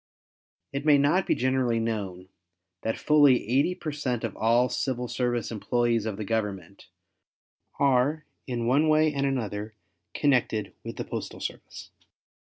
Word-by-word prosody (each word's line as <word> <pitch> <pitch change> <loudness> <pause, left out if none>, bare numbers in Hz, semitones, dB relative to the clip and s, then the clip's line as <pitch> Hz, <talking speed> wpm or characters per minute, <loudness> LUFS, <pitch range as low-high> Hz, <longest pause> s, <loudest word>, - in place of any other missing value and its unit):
It 140 +1 -3
may 150 -2 +6
not 145 +7 +2
be - - +3
generally 130 -2 +1
known 100 -5 -3 0.5
that 110 - -2
fully 145 -7 +4
80 140 +9 +2
per 155 - -5
cent 130 -5 -3
of 115 -4 -3
all 120 +3 +3
civil 125 -1 -2
service 120 -2 -1
employees 115 0 0
of 105 -3 -3
the 105 - -4
Government 100 -4 -3 0.9
are 140 +3 +2 0.2
in 120 -3 -2
one 140 +6 +3
way 155 0 +3
and 140 -1 0
another 110 -5 -3 0.4
connected 125 -7 +1
with - - -6
the - - -5
postal - - -6
service. - - -7
125 Hz, 145 wpm, -27 LUFS, 110-140 Hz, 0.9 s, may